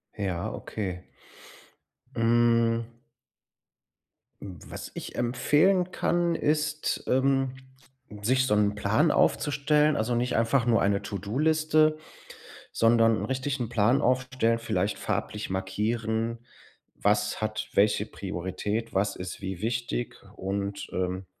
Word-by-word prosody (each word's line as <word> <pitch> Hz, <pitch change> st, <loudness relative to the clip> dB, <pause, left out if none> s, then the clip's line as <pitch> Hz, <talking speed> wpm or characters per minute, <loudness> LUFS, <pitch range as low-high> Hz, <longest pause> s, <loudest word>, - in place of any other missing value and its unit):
Ja, 95 Hz, -4 st, -3 dB
okay. 95 Hz, -4 st, -5 dB, 1.1 s
Hm. 115 Hz, 0 st, +2 dB, 1.5 s
Hm, 95 Hz, -3 st, -8 dB
was -, -, -7 dB
ich -, -, -7 dB
empfehlen 155 Hz, +10 st, +2 dB
kann, 175 Hz, -1 st, +1 dB
ist, 150 Hz, 0 st, 0 dB
ähm, 135 Hz, 0 st, +2 dB, 0.7 s
sich 130 Hz, +5 st, +2 dB
so 105 Hz, -, +1 dB
'n 105 Hz, 0 st, +2 dB
Plan 110 Hz, +10 st, +2 dB
aufzustellen. 150 Hz, +1 st, +2 dB
Also, 120 Hz, +2 st, 0 dB
nicht 125 Hz, +1 st, 0 dB
einfach 115 Hz, +2 st, +2 dB
nur 115 Hz, -1 st, +3 dB
eine 100 Hz, 0 st, +2 dB
To-do-Liste, 155 Hz, -, +1 dB, 0.7 s
sondern 115 Hz, -1 st, +4 dB
'n -, -, -3 dB
richtigen 130 Hz, -2 st, -2 dB
Plan 120 Hz, +2 st, +3 dB
aufstellen, 125 Hz, -2 st, +1 dB
vielleicht 110 Hz, -5 st, -1 dB
farblich 105 Hz, 0 st, -3 dB
markieren: 110 Hz, +4 st, -2 dB, 0.6 s
„Was 105 Hz, +1 st, +1 dB
hat 110 Hz, 0 st, -3 dB
welche 105 Hz, +1 st, +3 dB
Priorität, 100 Hz, +4 st, -4 dB
was 100 Hz, +2 st, 0 dB
ist 90 Hz, +1 st, -7 dB
wie 95 Hz, -2 st, -5 dB
wichtig?“ 115 Hz, -, -2 dB, 0.2 s
Und, 100 Hz, +1 st, -3 dB
ähm, 95 Hz, +1 st, -2 dB
115 Hz, 110 wpm, -27 LUFS, 100-130 Hz, 1.5 s, sondern